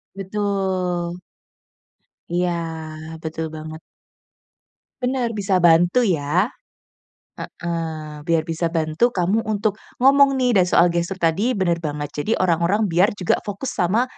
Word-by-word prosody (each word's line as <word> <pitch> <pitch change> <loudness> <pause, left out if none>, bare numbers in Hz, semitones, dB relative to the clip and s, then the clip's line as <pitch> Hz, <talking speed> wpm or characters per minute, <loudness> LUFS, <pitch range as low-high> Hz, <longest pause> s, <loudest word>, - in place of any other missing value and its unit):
Betul. 190 -3 -2 1.1
Iya, 180 +1 +1 0.7
betul 160 0 -4
banget. 155 0 -8 1.2
Bener 250 -2 0
bisa 200 -3 0
bantu 175 +8 +5
ya. 175 - +1 0.9
Heeh, 160 -3 -5
biar 165 -1 +2
bisa 165 +1 -1
bantu 160 +7 +1
kamu 185 +5 +2
untuk 210 -1 0 0.2
ngomong 275 +1 +5
nih 250 -1 +2
dan 185 -3 +4
soal 175 0 +4
gestur 170 +2 -1
tadi 190 +8 +1
bener 175 -3 +1
banget, 145 -2 -4
jadi 220 +9 0
orang-orang 180 +4 +2
biar 185 +2 +3
juga 180 -4 +1
fokus 210 +6 -5
sama, 195 +8 +1
180 Hz, 120 wpm, -21 LUFS, 165-210 Hz, 1.2 s, bantu